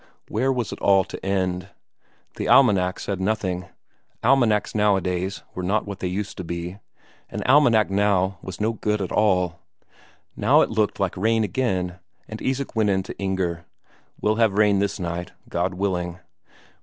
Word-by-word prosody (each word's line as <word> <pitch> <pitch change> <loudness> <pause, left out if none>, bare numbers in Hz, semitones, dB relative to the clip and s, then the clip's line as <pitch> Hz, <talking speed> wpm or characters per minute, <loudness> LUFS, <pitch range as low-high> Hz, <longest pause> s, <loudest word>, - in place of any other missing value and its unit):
Where 130 +5 +1
was 125 -4 -2
it - - -7
all 95 -1 +5
to - - -9
end? 95 -2 -1 0.7
The - - -3
almanac 90 -2 +4
said 95 -2 -3
nothing 95 -3 -1 0.6
almanacs 120 -4 +3
nowadays 95 -2 0
were 90 - -4
not 100 +4 0
what 100 -2 -7
they 90 - -2
used 100 +3 -4
to 95 - -4
be; 85 +3 -5 0.5
an - - -4
almanac 120 -7 +4
now 95 -2 +1
was 95 -1 -8
no 110 +2 +1
good 105 -1 -1
at 95 - -3
all. 90 -5 +2 0.8
Now - - +4
it - - +1
looked 110 -2 0
like 95 -3 0
rain 110 +4 +2
again, 95 -7 -1 0.3
and 110 - -8
Isak 130 0 -2
went 110 -2 +2
in 95 -1 +1
to - - -9
Inger: 95 -4 -2 0.5
"We'll 110 +1 +1
have 115 -3 +3
rain 105 -2 +4
this 100 +1 -1
night, 85 0 -4 0.2
God 90 +2 -1
willing." 90 -2 -2
100 Hz, 165 wpm, -23 LUFS, 90-110 Hz, 0.8 s, all